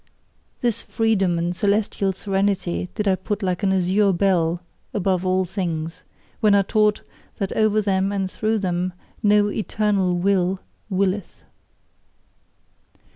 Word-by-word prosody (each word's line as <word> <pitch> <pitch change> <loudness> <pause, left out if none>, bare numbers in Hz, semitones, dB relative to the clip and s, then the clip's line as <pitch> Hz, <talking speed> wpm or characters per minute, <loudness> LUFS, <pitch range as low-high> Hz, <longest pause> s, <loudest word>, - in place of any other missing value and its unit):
This 240 -4 0
freedom 195 -6 +1
and 175 +1 -1
celestial 200 0 +1
serenity 190 -2 -1
did 210 -2 -1
I 195 - +4
put 205 +2 -3
like 180 0 -1
an 195 -2 +2
azure 190 +2 +3
bell 175 -2 +1 0.3
above 190 -2 +1
all 185 0 +2
things, 170 -2 -4 0.4
when 210 -2 +4
I 200 - +4
taught 210 +1 +2 0.3
that 195 - -2
over 215 -1 +2
them 195 0 +1
and 195 -1 -1
through 220 +1 0
them, 180 -2 -1 0.3
no 205 -1 +4
"eternal 205 -4 0
Will" 185 0 +1 0.3
willeth. 195 0 -1
195 Hz, 130 wpm, -22 LUFS, 180-205 Hz, 0.4 s, I